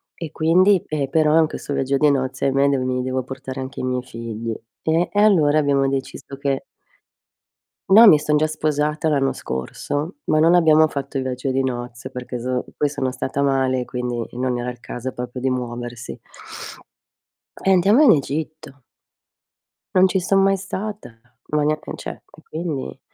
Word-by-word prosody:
e 165 -3 -7
quindi, 180 +4 +3
eh, 145 -3 -2
però 155 +1 +3
in 160 - +4
questo 145 - -6
viaggio 135 +1 0
di 150 +2 +4
nozze, 130 -1 -1
ahimè 135 +1 +3
de 140 - +2
mi 130 0 -1
devo 130 0 -2
portare 130 0 -7
anche 130 -1 -7
i - - -5
miei 125 -1 -1
figli. 115 -2 -5 0.3
Eh, 165 +2 +1
e 205 - 0
allora 155 -8 +4
abbiamo 140 -2 +2
deciso 135 0 -5
che 140 -1 -1 1.3
no, 220 +4 +9
mi 155 -8 +8
son 150 0 +1
già 155 - +3
sposata 155 0 -1
l'anno 135 -3 +1
scorso, 145 - -4
ma 155 - +2
non 165 +3 +5
abbiamo 160 -2 +5
fatto 140 -2 -5
il 130 - -1
viaggio 130 +1 -3
di 135 +1 +1
nozze, 120 0 -5
perché 125 -1 -6
zo 125 +1 -2
poi 145 - +1
sono 130 -2 -2
stata 135 +2 -3
male, 130 -2 +1
quindi 125 -2 -3
non 125 0 -1
era 120 +1 -3
il 125 - -10
caso 125 +2 -5
proprio 125 +1 -6
di 130 - +1
muoversi. 120 -1 -5 1.4
Eh, 195 - +3
andiamo 200 - +5
in 265 - +8
Egitto. 145 -1 -3 1.1
Non 185 +1 +7
ci 190 0 0
son 195 +2 +2
mai 195 0 +3
stata, 210 -3 -5 0.4
ma 150 - +2
nea 155 +1 +1
e - - -5
cioè - - -7 0.2
e - - -16
quindi 155 -4 -4
140 Hz, 175 wpm, -21 LUFS, 130-155 Hz, 1.4 s, no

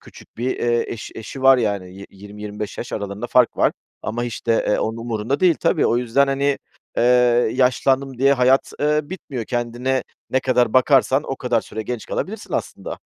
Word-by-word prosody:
küçük - - -16
bir, 125 +3 -1
eee, 120 0 +1
eş 115 - -7
eşi 130 +4 -8
var 135 -1 +7
yani. 100 -5 -2
Yi 100 +1 -10
yirmi, 105 +2 -12
25 105 0 -6
yaş 120 - -6
aralarında 100 +2 -4
fark 125 -1 +3
var - - +3 0.3
ama, 120 +2 -3
işte, 115 -1 -1
eee, - - +2
onun 110 +1 -2
umurunda 115 +3 -2
değil. 180 -3 +5
Tabii, - - +2
o 120 - +2
yüzden, 125 +3 +2
hani, 140 +1 0 0.4
eee, - - +2 0.5
yaşlandım 130 +1 +1
diye 135 +2 +5
hayat 130 0 +3
eee, 150 +1 +2
bitmiyor. 145 -8 -6
Kendine 120 +2 -1 0.3
ne 130 - +2
kadar 125 -4 +2
bakarsan, 135 +1 +4
o 135 - -4
kadar 120 -3 0
süre 110 - -6
genç 120 0 -5
kalabilirsin 215 +2 -5
aslında. - - -4
125 Hz, 185 wpm, -21 LUFS, 110-135 Hz, 0.5 s, var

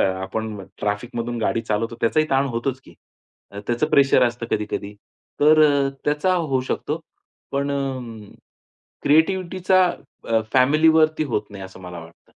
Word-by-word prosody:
आपण 100 +3 -2 0.2
ट्रॅफिकमधून 115 +3 -3
गाडी 115 - 0
चालवतो, 115 +1 -2
त्याचाही 155 +7 +2
ताण 135 +1 +2
होतोच 130 +2 -3
की. - - -16 0.7
त्याचं 120 +5 0
प्रेशर 135 -2 +5
असतं 120 -1 -4
कधी-कधी. 105 -1 -3 0.5
तर 155 +1 +6
अ, 140 -2 +3 0.2
त्याचा 150 +6 +1
होऊ 145 -7 0
शकतो. - - -2 0.5
पण 140 +1 -1
अ, 140 - 0 1.3
क्रिएटिव्हिटीचा 185 +3 +3 0.4
अ, 115 -1 +3
फॅमिलीवरती 155 +4 +4
होत 105 0 -2
नाही 100 -2 -8
असं 95 0 -12
मला 90 -1 -8
वाटतं. 85 0 -17
130 Hz, 130 wpm, -22 LUFS, 110-155 Hz, 1.3 s, तर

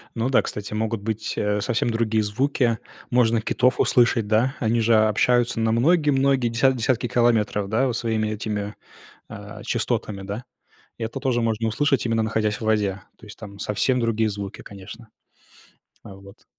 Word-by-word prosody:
Ну 115 +2 -1
да, 135 - +4
кстати, 105 0 -6
могут 110 0 -2
быть, 110 +1 -3
э, 105 0 0
совсем 120 0 0
другие 115 -1 0
звуки. 115 +1 0 0.3
Можно 115 -2 +3
китов 125 +2 +1
услышать, 120 -4 +3
да? 115 +6 +2
Они 115 -1 +1
же 115 0 +3
о 110 0 +4
общаются 120 +2 +2
на 110 0 +1
многие, 150 +5 +3
многие 135 -2 +2
десятки 130 +3 +2
десятки 120 +1 0
километров, 110 -4 +1
да, 125 +5 +2
вот 120 -1 -2
своими 110 -2 -1
этими, 105 -1 -4 0.5
а, - - -9
частотами, 100 -2 -2
да. 100 +5 -5 0.6
Это 115 +4 -4
тоже 130 -3 0
можно 115 0 0
услышать, 135 +3 +1
именно 115 -1 +1
находясь 110 -1 0
в - - -11
воде. 105 -3 0 0.2
То 115 - -15
есть, 105 - -12
там 100 -2 -10
совсем 125 +6 0
другие 115 -2 +1
звуки, 100 -1 -7
конечно. 100 +3 -11 1.0
А 95 - -11
вот. 100 0 -16
115 Hz, 170 wpm, -23 LUFS, 105-120 Hz, 1.0 s, да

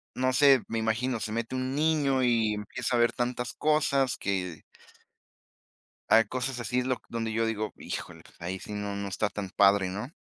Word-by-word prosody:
no 130 0 +1
sé, 135 -2 +6
me 115 - -2
imagino, 115 +2 0
se 105 +1 -4
mete 115 +3 -3
un 130 +1 -2
niño 145 -4 +2
y 115 -3 +2
empieza 115 +4 -3
a 120 - +2
ver 120 - +3
tantas 125 -2 -2
cosas 140 -3 +2
que 90 -4 -3 1.5
Hay 115 - +7
cosas 130 0 -3
así 125 +3 0
do 130 -1 -1
donde 115 -1 -3
yo 115 +1 +1
digo, 110 -1 -2
híjole, - - -6 0.2
ahí 90 +2 -4
sí - - -9
no 105 -1 -3
no 100 0 -3
está 105 +2 -1
tan 100 -3 -5
padre, 100 -1 +4
¿no? 105 +7 -5
115 Hz, 180 wpm, -28 LUFS, 105-130 Hz, 1.5 s, Hay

